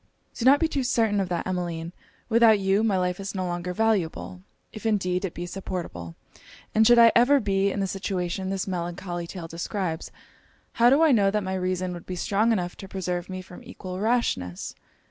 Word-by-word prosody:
'Do 235 - -4
not 275 +2 +7
be 325 - +2
too 285 -3 -2
certain 225 -4 +1
of 190 -2 -1
that, 175 -1 -2
Emmeline. 175 -2 -3 0.3
Without 230 -2 +5
you, 195 +2 +2
my 210 -4 +2
life 180 0 -1
is 195 +1 -5
no 185 -1 -2
longer 175 0 -3
valuable 185 -3 -1 0.3
if 215 - -9
indeed 190 -5 0
it 190 - -4
be 175 - -4
supportable; 175 - -6 0.6
and 220 0 +5
should 240 0 +7
I 230 -1 +8
ever 265 +4 +5
be 200 -3 +1
in 200 - -2
the - - +1
situation 190 -1 -3
this 195 0 -2
melancholy 175 -1 -4
tale 170 -2 -7
describes, 165 0 -4 0.6
how 235 +1 +4
do 280 +5 +5
I 320 - +5
know 205 -6 +4
that 210 +1 -1
my 190 0 -3
reason 185 -1 -2
would 175 - -10
be 185 - -4
strong 210 +5 +1
enough 180 -5 -1
to 195 - -9
preserve 180 -2 -3
me 185 0 -5
from 180 0 -13
equal 185 0 -7
rashness. 200 - -1
190 Hz, 200 wpm, -25 LUFS, 180-215 Hz, 0.6 s, I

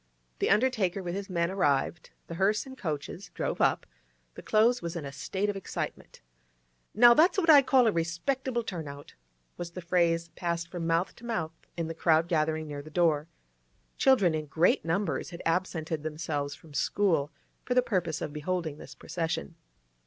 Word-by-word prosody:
The - - +1
undertaker 210 -6 +2
with 175 -1 -3
his 200 +1 -5
men 170 -1 0
arrived; 160 -3 0 0.2
the - - -8
hearse 195 +5 +1
and 265 -1 -10
coaches 165 - -5
drove - - -2
up; - - +2 0.5
the - - -10
Close 235 +3 +3
was 170 0 -4
in 165 -4 -4
a 140 - -6
state 190 +8 -2
of 205 - -1
excitement. 195 - -6 0.7
'Now 240 +2 +8
that's 340 +9 +4
what 335 -4 +5
I 290 -2 +9
call 260 -2 +4
a 220 - +4
respectable 235 +10 -1
turn 170 -8 -5
out!' 140 0 -10 0.4
was 175 -1 -5
the 180 - -6
phrase 170 -1 +1
passed 170 0 -3
from 170 -2 -3
mouth 165 +2 0
to - - -16
mouth 165 -9 -2 0.2
in 165 - -1
the 165 - -4
crowd 160 0 +3
gathering 155 -1 0
near 145 -1 -5
the 155 - -12
door. 155 -2 +2 0.7
Children 205 -11 +4
in 155 -1 -3
great 160 +5 +2
numbers 170 +1 -1
had 170 0 -9
absented 165 -2 -1
themselves 150 -2 -3
from 155 0 -17
school 160 -3 +1 0.3
for 250 - -1
the 250 - +5
purpose 180 -9 -1
of 145 - -5
beholding 155 -1 -3
this - - -11
procession. 160 - -3
170 Hz, 180 wpm, -29 LUFS, 160-200 Hz, 0.7 s, I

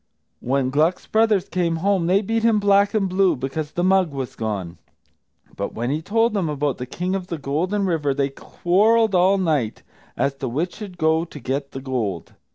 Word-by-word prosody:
When 130 0 0
Gluck's 155 +6 +1
brothers 220 -4 +2
came 170 -2 0
home, 185 0 +1
they 195 +4 +3
beat 225 +3 0
him 225 -2 +3
black 200 +1 +3
and 200 -3 +2
blue, 185 -2 +2
because 135 +4 -4
the 175 - -1
mug 190 -1 +3
was 135 -3 -5
gone. 100 -6 -4 0.8
But 100 - -4
when 120 +3 -2
he 150 +2 -1
told 225 +6 +1
them 190 -6 0
about 145 -2 -1
the 125 - -5
King 180 +8 -3
of 190 -2 -3
the 170 - -4
Golden 170 +9 -1
River 160 -6 0
they 140 0 0
quarrelled 210 +10 +2
all 185 +2 +4
night, 150 - -1 0.3
as 140 - +1
to 135 - -4
which 160 +9 -2
should 200 -4 -8
go 160 0 +2
to 150 - -11
get 140 +2 -3
the 135 - -7
gold. 115 - -3
165 Hz, 195 wpm, -22 LUFS, 135-195 Hz, 0.8 s, all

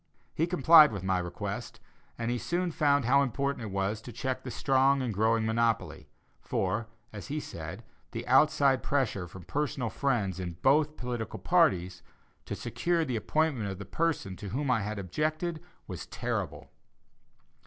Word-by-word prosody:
He 165 - 0
complied 160 -3 +7
with 100 -4 -5
my 95 -1 +1
request, 85 -1 -5 0.4
and 115 +1 -2
he 120 - -1
soon 175 +4 -1
found 145 -4 +2
how 140 +3 +5
important 140 -1 -1
it - - -5
was 100 +3 -1
to 120 - -9
check 130 +3 -3
the 130 - -7
strong 135 +3 +3
and 120 -4 -2
growing 110 +2 +2
monopoly; 115 0 0 0.3
for, 105 +4 -1 0.3
as 100 -3 -8
he 150 +2 -2
said, 85 - -7 0.3
the 115 - -6
"outside 135 -1 +4
pressure" 110 -10 -1
from 90 +1 -11
personal 135 - -2
friends 105 -10 0
in 90 -2 -4
both 150 +2 +3
political 120 -3 -4
parties, 90 -1 +2 0.4
to - - -4
secure 170 -2 -1
the 130 -4 -2
appointment 135 -2 0
of 95 - -5
the 100 - -8
person 160 - -1
to 100 - -7
whom 135 +5 -1
I 115 -3 +2
had 105 +2 -4
objected, 155 - -2 0.2
was - - -7
terrible. - - -4
120 Hz, 165 wpm, -29 LUFS, 100-145 Hz, 0.4 s, complied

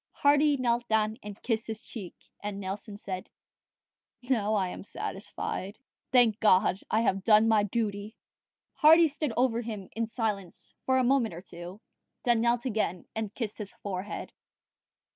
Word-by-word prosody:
Hardy 290 0 +4
knelt 240 -1 0
down 220 +1 +1
and 205 0 -8
kissed 225 -2 -1
his 220 -1 -5
cheek; 195 -7 -8 0.2
and 205 -1 -5
Nelson 200 +2 -5
said, 185 -2 -6 0.9
"Now 220 -4 +1
I 190 -3 +1
am - - -7
satisfied. 200 0 -5 0.3
Thank 240 -4 +5
God, 190 -3 +4
I 220 - +2
have 195 -4 +1
done 215 0 +6
my 220 -2 +5
duty!" 205 0 -2 0.6
Hardy 320 +2 +7
stood 295 -2 -2
over 240 -2 +2
him 215 -5 -6
in 230 0 -1
silence 210 -6 -4
for 260 0 +4
a 260 - +3
moment 245 -7 +2
or 170 - -7
two, 175 +3 -10 0.4
then 240 -3 +3
knelt 240 +1 +1
again 210 -7 -1
and 220 -2 -3
kissed 225 -4 -4
his 205 -2 -6
forehead. 195 0 -5
220 Hz, 155 wpm, -29 LUFS, 200-240 Hz, 0.9 s, Hardy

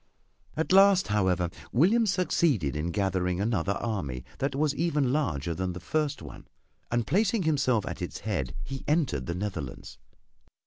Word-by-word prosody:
At 160 - -1
last, 195 - +6
however, 95 -4 +1 0.2
William 210 - +4
succeeded 160 - +1
in 75 +3 -2
gathering 90 -1 0
another 100 -3 0
army 75 - -3
that 140 0 -1
was 145 +1 +1
even 145 -5 +1
larger 85 - -1
than 90 +2 -3
the 90 - -6
first 150 - -2
one, - - -11 0.4
and 120 -1 0
placing 200 - +2
himself 140 -8 +1
at - - -6
its 90 - -5
head 80 - -2
he 135 -1 -6
entered 145 - +1
the 85 - -2
Netherlands. 90 -9 -5
110 Hz, 150 wpm, -28 LUFS, -, 0.4 s, last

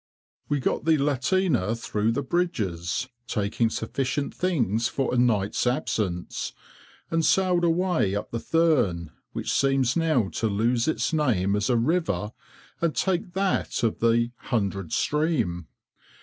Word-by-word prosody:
We 145 -1 +1
got 135 - -1
the 160 -1 +4
lateener 140 - +1
through 110 0 0
the 140 +4 -1
bridges, 115 - -1 0.2
taking 105 +3 0
sufficient 135 +5 -2
things 120 - 0
for 135 -2 -1
a - - +1
night's 110 -2 +1
absence, 100 -7 -2 0.6
and 165 0 +1
sailed 180 0 +3
away 170 - +1
up 105 - -4
the 115 - -2
Thurne, 115 - +1 0.2
which - - -2
seems 135 -2 +2
now 155 - +2
to 115 - -1
lose 115 +4 +1
its 160 - 0
name 105 - +2
as 105 +2 0
a 120 - +3
river, 115 - 0 0.5
and 170 -2 +1
take 185 -1 -1
that 190 -8 0
of 115 - 0
the 115 +1 +2
"Hundred 100 -7 -2
Stream." 125 - 0
125 Hz, 135 wpm, -26 LUFS, 105-160 Hz, 0.6 s, the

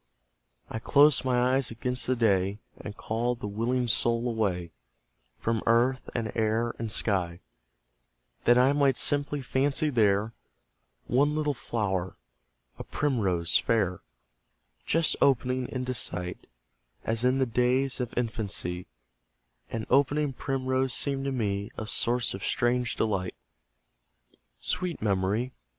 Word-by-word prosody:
I 110 - -5
closed 145 +4 +4
my 125 0 +2
eyes 135 -2 +1
against 125 +2 -2
the 130 - +2
day, 100 -4 +2 0.2
And 105 0 -9
called 120 +2 -2
my - - -6
willing 120 +4 -1
soul 120 +1 +1
away, 95 -7 -1 0.7
From 115 -1 -1
earth, 120 +3 +2
and 115 -2 -2
air, 115 +1 0
and 115 -2 -3
sky; 90 -6 0 1.1
That 120 +1 +6
I 130 +3 +5
might 140 -3 +3
simply 145 -1 +1
fancy 140 +4 +1
there 110 -2 +2 0.7
One 145 +5 +2
little 150 -1 0
flower 95 -8 -3 0.6
a - - -4
primrose 95 - 0
fair, 95 -6 0 0.9
Just 165 0 +2
opening 125 -1 +2
into 130 -1 -3
sight; 90 -6 -3 0.6
As 115 +1 -1
in 130 +1 +3
the 135 - +2
days 125 +3 +1
of 125 -2 -4
infancy, 105 -7 -3 0.8
An 115 -1 -4
opening 140 +2 +2
primrose 130 -1 -1
seemed 135 -1 -1
to 135 - -1
me 100 -5 -2
A 110 - -4
source 120 +2 +2
of 95 - -7
strange 125 0 0
delight. 95 -5 -1 1.2
Sweet 180 -2 -2
Memory! 105 +4 0
120 Hz, 125 wpm, -28 LUFS, 105-130 Hz, 1.2 s, That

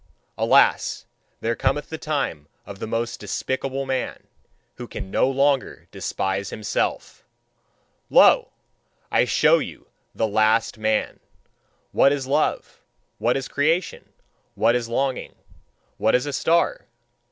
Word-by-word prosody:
Alas! - - +3 0.4
There 115 +1 0
cometh 150 - -1
the 160 - -5
time 135 - -3 0.2
of 100 -1 -10
the - - -5
most 115 +1 -3
despicable 135 +1 -3
man, 130 -1 -3 0.5
who - - -7
can 95 - -7
no 130 - +2
longer 135 0 0
despise 95 0 -3
himself. 105 -1 -3 0.9
Lo! - - +6 0.6
I - - +3
show - - +4
you - - -7 0.3
THE 110 - +1
LAST 110 +1 +2
MAN. 110 0 0 0.7
"What 140 - +4
is 140 -2 -1
love? 145 +3 -1 0.4
What 120 +3 +1
is 135 - -4
creation? 160 +5 -1 0.5
What 115 +1 +3
is 120 -1 -1
longing? 130 +2 -2 0.6
What - - +2
is 125 - +1
a 145 - -4
star?" 170 - +1
130 Hz, 125 wpm, -23 LUFS, 110-140 Hz, 0.9 s, Lo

